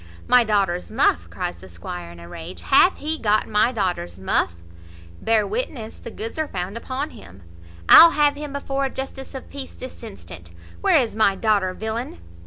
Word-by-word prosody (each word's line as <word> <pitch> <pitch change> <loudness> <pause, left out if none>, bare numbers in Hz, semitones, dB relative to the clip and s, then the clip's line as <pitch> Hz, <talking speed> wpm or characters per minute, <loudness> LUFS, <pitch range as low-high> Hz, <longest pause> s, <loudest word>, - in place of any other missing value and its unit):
"My 250 -1 +6
daughter's 195 -5 0
muff!" - - +1
cries 85 - -4
the 95 +2 -14
squire 85 0 -8
in 85 - -13
a 85 - -11
rage. 165 - -9
"Hath 355 +7 +4
he 310 +2 -2
got 215 -1 +1
my 210 +3 +2
daughter's 175 - -2
muff? 95 -2 0 0.7
bear 220 -2 +2
witness 270 - -4
the - - -8
goods 225 +5 -7
are 310 - 0
found 185 -1 -5
upon 260 +5 -4
him. 95 +1 -14 0.4
I'll 335 - +10
have 295 -2 +3
him 290 0 -7
before 275 -1 -2
a - - -1
justice 270 +1 -7
of 265 - -7
peace 275 -2 -7
this 255 - -10
instant. 85 -2 -10 0.3
Where - - +4
is 235 -4 0
my 215 -3 +3
daughter, 200 -2 +1
villain?" 220 - -4
220 Hz, 185 wpm, -22 LUFS, 175-270 Hz, 0.7 s, I'll